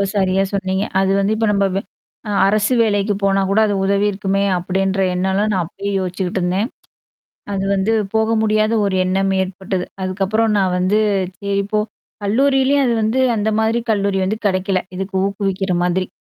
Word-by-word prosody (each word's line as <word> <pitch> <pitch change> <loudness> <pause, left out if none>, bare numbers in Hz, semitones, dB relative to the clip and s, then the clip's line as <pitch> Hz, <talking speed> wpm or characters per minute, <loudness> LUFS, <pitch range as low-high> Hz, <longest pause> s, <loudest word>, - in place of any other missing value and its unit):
சரியா 190 -1 +2
சொன்னீங்க. 190 0 -1 0.2
அது 195 0 +2
வந்து 200 +2 +1
இப்ப 225 0 0
நம்ப 200 -1 +2 0.6
அ - - -1 0.2
அரசு 210 +4 +2
வேலைக்கு 205 -2 +1
போனா 195 0 +2
கூட 200 +2 +3
அது 205 - 0
உதவி 200 +1 +2
இருக்குமே! 195 0 -1
அப்பிடின்ற 190 +2 -1
எண்ணம்லாம் 190 +3 0
நான் 185 -2 +1
அப்பயே 200 +4 -5
யோசிச்சுக்கிட்டு 185 0 -2
இருந்தேன். 185 +7 0 0.8
அது 195 -1 -2
வந்து 195 +3 0 0.2
போக 220 0 +2
முடியாத 215 0 +2
ஒரு 195 -1 0
எண்ணம் 195 +1 +1
ஏற்பட்டது. 190 0 -3 0.2
அதுக்கப்புறம் 200 +4 0
நான் 190 -2 +1
வந்து 185 +4 +2 0.4
சரி 200 0 0
போ 215 - +3 0.4
கல்லூரியிலயும் 270 +5 +2
அது 240 - +2
வந்து 220 +5 0 0.2
அந்த 210 +1 0
மாதிரி 225 +2 +1
கல்லூரி 200 -2 0
வந்து 215 +3 -2
கிடைக்கல. 185 0 0 0.2
இதுக்கு 190 +1 -5
ஊக்குவிக்கிற 195 -1 -2
மாதிரி. 180 +1 0
195 Hz, 160 wpm, -18 LUFS, 190-215 Hz, 0.8 s, கூட